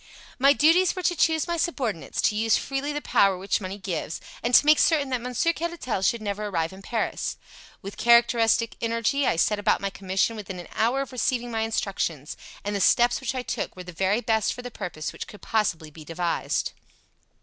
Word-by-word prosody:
"My 275 Hz, +2 st, +6 dB
duties 330 Hz, +6 st, +4 dB
were 370 Hz, -, -5 dB
to 350 Hz, -, +2 dB
choose 320 Hz, -1 st, +2 dB
my 340 Hz, 0 st, -1 dB
subordinates, 255 Hz, -, -2 dB
to 210 Hz, -, +2 dB
use 220 Hz, +1 st, +3 dB
freely 275 Hz, +2 st, -3 dB
the 295 Hz, 0 st, -4 dB
power 195 Hz, -2 st, +3 dB
which 195 Hz, +3 st, -1 dB
money 190 Hz, +1 st, -5 dB
gives, 185 Hz, -5 st, -4 dB, 0.2 s
and 240 Hz, +1 st, +2 dB
to -, -, +7 dB
make 305 Hz, 0 st, +6 dB
certain 295 Hz, -5 st, +3 dB
that 255 Hz, -2 st, -1 dB
Monsieur 250 Hz, +7 st, 0 dB
Caratal 335 Hz, -, -3 dB
should 215 Hz, +4 st, +1 dB
never 210 Hz, 0 st, -3 dB
arrive 165 Hz, -3 st, -2 dB
in 190 Hz, -, -12 dB
Paris. 225 Hz, +2 st, -2 dB, 0.5 s
With 195 Hz, +1 st, -8 dB
characteristic 235 Hz, -1 st, +4 dB
energy 230 Hz, +4 st, 0 dB
I -, -, +2 dB
set 205 Hz, +5 st, +1 dB
about 205 Hz, -, +2 dB
my 200 Hz, -1 st, -3 dB
commission 195 Hz, +4 st, -1 dB
within 195 Hz, -4 st, -7 dB
an 175 Hz, -, -10 dB
hour 240 Hz, +5 st, +1 dB
of 275 Hz, -, -6 dB
receiving 245 Hz, -1 st, -1 dB
my 225 Hz, -1 st, -1 dB
instructions, 190 Hz, -9 st, -2 dB, 0.3 s
and 205 Hz, 0 st, -3 dB
the 200 Hz, -, -1 dB
steps 240 Hz, +6 st, +4 dB
which 265 Hz, 0 st, -3 dB
I 255 Hz, -, -2 dB
took -, -, -4 dB
were 180 Hz, -, -8 dB
the 180 Hz, -, -9 dB
very 195 Hz, +6 st, +1 dB
best 220 Hz, -3 st, +1 dB
for 245 Hz, -, -9 dB
the 245 Hz, -, -7 dB
purpose 155 Hz, -7 st, -5 dB
which -, -, -7 dB
could 210 Hz, -, -13 dB
possibly 170 Hz, -8 st, -1 dB
be 155 Hz, +1 st, -12 dB
devised. 170 Hz, +2 st, -2 dB
225 Hz, 205 wpm, -25 LUFS, 195-260 Hz, 0.5 s, to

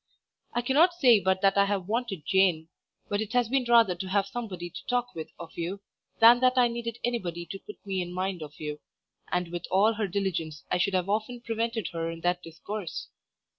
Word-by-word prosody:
I 240 Hz, -, +1 dB
cannot 315 Hz, +8 st, +4 dB
say 245 Hz, -10 st, +6 dB
but 190 Hz, -1 st, +1 dB
that 195 Hz, 0 st, +4 dB
I 200 Hz, -, +6 dB
have 200 Hz, -3 st, -2 dB
wanted 215 Hz, -7 st, -2 dB
Jane; 180 Hz, -4 st, +2 dB, 0.4 s
but 205 Hz, +1 st, -1 dB
it 220 Hz, +2 st, -4 dB
has 245 Hz, -2 st, +2 dB
been 265 Hz, 0 st, +1 dB
rather 230 Hz, -5 st, +6 dB
to 180 Hz, +2 st, -6 dB
have 195 Hz, 0 st, +2 dB
somebody 195 Hz, -6 st, -6 dB
to -, -, -9 dB
talk 245 Hz, 0 st, 0 dB
with 160 Hz, -1 st, -6 dB
of 170 Hz, -1 st, -10 dB
you, 175 Hz, +4 st, -3 dB, 0.4 s
than 235 Hz, +2 st, +8 dB
that 255 Hz, 0 st, +3 dB
I 245 Hz, -1 st, +5 dB
needed 235 Hz, 0 st, -4 dB
anybody 180 Hz, -8 st, -2 dB
to 195 Hz, +4 st, -7 dB
put 210 Hz, -, -11 dB
me 190 Hz, -2 st, -1 dB
in 175 Hz, 0 st, -5 dB
mind 185 Hz, -1 st, -2 dB
of 150 Hz, -1 st, -9 dB
you, 150 Hz, -1 st, -5 dB, 0.5 s
and 180 Hz, -1 st, 0 dB
with 175 Hz, 0 st, -5 dB
all 205 Hz, +4 st, +4 dB
her 215 Hz, -1 st, -1 dB
diligence 175 Hz, -6 st, -2 dB
I 180 Hz, -, +2 dB
should 195 Hz, +1 st, +1 dB
have 185 Hz, 0 st, +1 dB
often 220 Hz, +4 st, -2 dB
prevented 230 Hz, -3 st, -2 dB
her 165 Hz, -1 st, -3 dB
in 165 Hz, 0 st, -7 dB
that 175 Hz, +1 st, +1 dB
discourse. 180 Hz, +3 st, -6 dB
195 Hz, 210 wpm, -28 LUFS, 175-230 Hz, 0.5 s, than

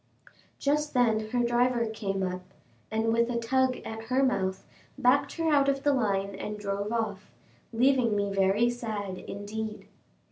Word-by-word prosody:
Just 295 Hz, +1 st, 0 dB
then 220 Hz, -3 st, +2 dB
her 245 Hz, +1 st, +1 dB
driver 240 Hz, 0 st, +2 dB
came 200 Hz, -3 st, -3 dB
up, 185 Hz, 0 st, -2 dB, 0.5 s
and 220 Hz, +1 st, +1 dB
with 235 Hz, +1 st, +2 dB
a 240 Hz, -, -1 dB
tug 255 Hz, +2 st, +1 dB
at 225 Hz, 0 st, -6 dB
her 255 Hz, +3 st, +2 dB
mouth, 190 Hz, -7 st, 0 dB, 0.3 s
backed 275 Hz, +1 st, +3 dB
her 325 Hz, -2 st, +1 dB
out 280 Hz, -1 st, +4 dB
of 275 Hz, 0 st, -1 dB
the 290 Hz, -, +3 dB
line 200 Hz, -5 st, 0 dB
and 210 Hz, +2 st, -5 dB
drove 200 Hz, 0 st, -3 dB
off, 215 Hz, -4 st, -2 dB, 0.4 s
leaving 245 Hz, -1 st, +3 dB
me 200 Hz, -1 st, 0 dB
very 195 Hz, +4 st, +3 dB
sad, 215 Hz, -6 st, -4 dB
indeed. 210 Hz, +3 st, -6 dB
225 Hz, 155 wpm, -28 LUFS, 205-250 Hz, 0.5 s, out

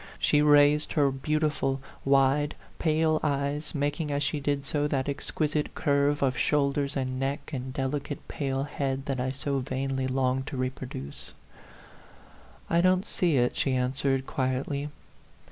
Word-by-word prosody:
She 150 Hz, -, +3 dB
raised 150 Hz, 0 st, +5 dB
her 145 Hz, -3 st, +3 dB
beautiful, 150 Hz, 0 st, 0 dB, 0.2 s
wide, 140 Hz, +2 st, +3 dB, 0.2 s
pale 155 Hz, -1 st, +2 dB
eyes, 145 Hz, +1 st, -1 dB
making 145 Hz, +2 st, -1 dB
as 145 Hz, 0 st, 0 dB
she 150 Hz, +1 st, 0 dB
did 145 Hz, 0 st, -1 dB
so 145 Hz, +1 st, +1 dB
that 135 Hz, -2 st, -1 dB
exquisite 150 Hz, +1 st, -2 dB
curve 145 Hz, 0 st, +2 dB
of 130 Hz, -2 st, +2 dB
shoulders 140 Hz, -1 st, +1 dB
and 130 Hz, -1 st, -2 dB
neck 135 Hz, +3 st, -3 dB
and 130 Hz, -1 st, -4 dB
delicate, 140 Hz, +1 st, -3 dB
pale 135 Hz, -3 st, -2 dB
head 135 Hz, -1 st, -3 dB
that 135 Hz, -2 st, -2 dB
I 130 Hz, +1 st, 0 dB
so 140 Hz, +1 st, -2 dB
vainly 130 Hz, 0 st, -2 dB
longed 130 Hz, +1 st, 0 dB
to 135 Hz, -, -5 dB
reproduce. 130 Hz, -, -5 dB, 0.6 s
" -, -, -24 dB
I 170 Hz, +1 st, +3 dB
don't 185 Hz, +2 st, +3 dB
see 170 Hz, -9 st, +1 dB
it," 125 Hz, 0 st, +2 dB
she 135 Hz, -2 st, +1 dB
answered, 130 Hz, +1 st, 0 dB
quietly. 135 Hz, +3 st, -2 dB
140 Hz, 145 wpm, -28 LUFS, 135-150 Hz, 0.6 s, raised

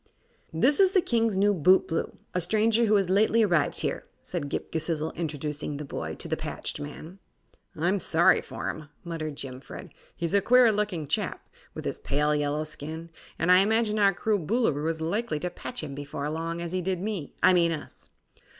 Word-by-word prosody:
"This 255 Hz, -, +3 dB
is 385 Hz, -1 st, +5 dB
the 375 Hz, -, +5 dB
King's 230 Hz, -, +1 dB
new 205 Hz, +1 st, +4 dB
bootblue, 185 Hz, 0 st, +2 dB, 0.2 s
a 180 Hz, -, 0 dB
stranger 220 Hz, +5 st, +3 dB
who 215 Hz, -1 st, +3 dB
has 195 Hz, -3 st, +2 dB
lately 215 Hz, +4 st, +3 dB
arrived 170 Hz, -8 st, +2 dB
here," -, -, -3 dB, 0.2 s
said 160 Hz, -6 st, -4 dB
Ghip -, -, -4 dB
Ghisizzle, 160 Hz, -1 st, -1 dB
introducing 150 Hz, -2 st, -4 dB
the 150 Hz, -, -6 dB
boy 80 Hz, -, -5 dB
to -, -, -5 dB
the -, -, 0 dB
patched -, -, -5 dB
man. 155 Hz, +5 st, -8 dB, 0.6 s
"I'm 180 Hz, +5 st, +1 dB
sorry 175 Hz, +2 st, +4 dB
for -, -, -6 dB
him," 155 Hz, -2 st, -11 dB
muttered 160 Hz, -4 st, -4 dB
Jimfred. 130 Hz, -1 st, -8 dB, 0.2 s
"He's 170 Hz, +1 st, -2 dB
a 200 Hz, -, +4 dB
queer 245 Hz, +2 st, +6 dB
looking 205 Hz, -7 st, -1 dB
chap, -, -, -2 dB, 0.3 s
with -, -, -6 dB
his -, -, -3 dB
pale 150 Hz, +1 st, +1 dB
yellow 150 Hz, +1 st, 0 dB
skin, 155 Hz, +2 st, -7 dB, 0.3 s
and 170 Hz, +2 st, +2 dB
I 180 Hz, -, +8 dB
imagine 215 Hz, +1 st, +2 dB
our 200 Hz, -1 st, +5 dB
cruel 210 Hz, +2 st, 0 dB
Boolooroo 160 Hz, -, 0 dB
is 160 Hz, -1 st, -3 dB
likely 190 Hz, +1 st, -1 dB
to 180 Hz, -, -2 dB
patch -, -, -5 dB
him 145 Hz, -2 st, -5 dB
before 145 Hz, 0 st, -5 dB
long, 165 Hz, +2 st, -3 dB
as 170 Hz, -1 st, -4 dB
he 185 Hz, 0 st, -1 dB
did 185 Hz, 0 st, -1 dB
me 195 Hz, -6 st, -4 dB
I -, -, +7 dB
mean 170 Hz, -2 st, +3 dB
us." 155 Hz, -3 st, -8 dB
170 Hz, 190 wpm, -27 LUFS, 155-205 Hz, 0.6 s, I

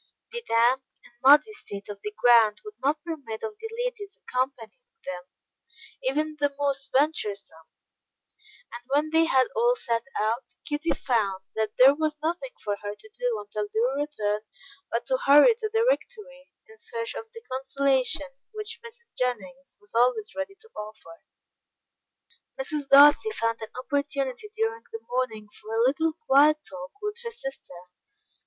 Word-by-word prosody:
The 475 Hz, 0 st, -4 dB
damp 235 Hz, +3 st, +4 dB, 0.2 s
and -, -, -18 dB
muddy 295 Hz, +10 st, +7 dB
state 200 Hz, -, -8 dB
of 205 Hz, -1 st, -8 dB
the 210 Hz, -, -3 dB
ground 230 Hz, -3 st, +6 dB
would 425 Hz, -, -8 dB
not 295 Hz, +3 st, +1 dB
permit 280 Hz, -10 st, -6 dB
of 435 Hz, -1 st, -4 dB
the 450 Hz, 0 st, -6 dB, 0.2 s
ladies 415 Hz, -5 st, -5 dB
accompanying 255 Hz, -, -2 dB, 0.3 s
them, 180 Hz, -1 st, -6 dB, 0.8 s
even 310 Hz, -11 st, -1 dB
the 285 Hz, -1 st, +1 dB
most 275 Hz, -1 st, -1 dB
venturesome, 205 Hz, -, -1 dB, 1.0 s
and 240 Hz, -, -7 dB
when 295 Hz, +3 st, +1 dB
they 325 Hz, +1 st, +5 dB
had 260 Hz, -5 st, +3 dB
all 480 Hz, +1 st, +3 dB
set 235 Hz, -, -1 dB, 0.2 s
out, 225 Hz, +5 st, 0 dB, 0.2 s
Kitty 300 Hz, +2 st, -2 dB
found 200 Hz, -7 st, 0 dB
that 220 Hz, -1 st, -2 dB
there 265 Hz, +2 st, +8 dB
was 305 Hz, 0 st, -1 dB
nothing 345 Hz, +10 st, -2 dB
for 205 Hz, -1 st, -1 dB
her 205 Hz, 0 st, -5 dB
to 435 Hz, -, -16 dB
do 245 Hz, -, -2 dB
until 210 Hz, 0 st, -4 dB
their 255 Hz, +6 st, +1 dB
return 210 Hz, -8 st, -2 dB, 0.5 s
but 235 Hz, -, -2 dB
to 260 Hz, -, +1 dB
hurry 295 Hz, -, +8 dB
to 445 Hz, -1 st, -4 dB
the 450 Hz, +1 st, +2 dB
Rectory -, -, -2 dB, 0.2 s
in 445 Hz, -1 st, -16 dB
search 460 Hz, -1 st, -3 dB
of 450 Hz, -, -8 dB
the 460 Hz, -1 st, -10 dB
consolation 270 Hz, +1 st, +1 dB, 0.2 s
which 430 Hz, +1 st, -5 dB
Mrs. 470 Hz, 0 st, -12 dB
Jennings 260 Hz, +2 st, -3 dB
was 415 Hz, -1 st, -9 dB
always 235 Hz, -2 st, +2 dB
ready 290 Hz, +7 st, -4 dB
to 450 Hz, -, -18 dB
offer. 210 Hz, -, -10 dB, 1.4 s
Mrs. 285 Hz, +1 st, -2 dB
Darcy 290 Hz, +9 st, +8 dB
found 230 Hz, -, -1 dB
an 220 Hz, -, -6 dB
opportunity 280 Hz, -, -2 dB
during 450 Hz, +1 st, -1 dB
the 450 Hz, 0 st, -8 dB
morning 235 Hz, -4 st, -2 dB
for 220 Hz, +1 st, -5 dB
a 230 Hz, -, +3 dB
little 315 Hz, +5 st, +2 dB
quiet 295 Hz, +3 st, +6 dB
talk 275 Hz, -1 st, -8 dB
with 420 Hz, +1 st, -3 dB
her 465 Hz, -, -3 dB
sister. 465 Hz, -, -8 dB
280 Hz, 160 wpm, -26 LUFS, -, 1.4 s, there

